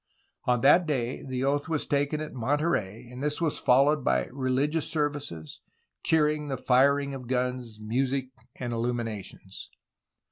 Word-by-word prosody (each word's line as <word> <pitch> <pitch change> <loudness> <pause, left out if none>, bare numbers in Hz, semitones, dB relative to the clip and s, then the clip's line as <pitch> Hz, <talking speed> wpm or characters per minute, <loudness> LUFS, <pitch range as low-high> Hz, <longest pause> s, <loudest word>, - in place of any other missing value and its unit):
On 125 -1 +2
that 170 +5 +6
day 130 -4 -1
the 130 -1 -3
oath 145 +3 0
was 160 -2 0
taken 145 +2 0
at 155 - -6
Monterey, 125 - -1
and 125 +1 -8
this 150 0 0
was 165 -3 0
followed 140 +3 +4
by 65 -1 +2
religious 140 +4 0
services, 145 - -3 0.4
cheering, 150 -1 +2
the 135 -2 -2
firing 140 +3 +3
of 130 -2 -7
guns, 125 -2 -2
music, 130 +4 -1 0.3
and 120 -2 -4
illuminations. 115 -5 -4
130 Hz, 140 wpm, -28 LUFS, 120-145 Hz, 0.4 s, that